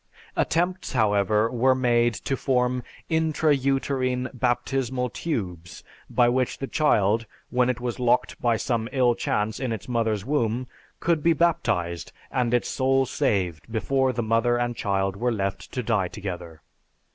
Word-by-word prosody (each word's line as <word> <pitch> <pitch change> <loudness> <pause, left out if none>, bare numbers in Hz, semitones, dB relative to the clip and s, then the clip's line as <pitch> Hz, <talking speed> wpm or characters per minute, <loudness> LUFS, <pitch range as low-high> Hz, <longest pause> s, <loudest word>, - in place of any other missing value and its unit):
Attempts, 180 +1 0
however, 105 -1 +2
were 130 +2 +3
made 120 -2 +2
to 135 - -2
form 125 -1 +1 0.3
intra 160 -1 +2
uterine 130 -1 0
baptismal 125 0 -1
tubes 90 - -4 0.3
by 120 -1 +3
which 125 +1 +1
the 135 - -3
child, 115 -7 +2 0.2
when 125 0 +2
it 125 -1 -1
was 125 0 -4
locked 125 0 +1
by 120 -2 +2
some 115 -1 -1
ill 125 -3 +3
chance 105 -1 -1
in 130 -2 -2
its 110 -4 -5
mother's 110 -4 0
womb, 125 -3 0 0.3
could 170 -3 +1
be 170 +2 +4
baptized 90 - 0 0.2
and 125 -2 0
its 120 -1 +1
soul 135 0 +2
saved 95 -5 -1
before 130 +5 +1
the 120 -1 -2
mother 115 +2 +2
and 120 0 -1
child 95 -3 0
were 120 +4 0
left 100 -3 -3
to 125 - -3
die 105 -5 +1
together. 90 -5 -7
120 Hz, 150 wpm, -25 LUFS, 110-130 Hz, 0.3 s, be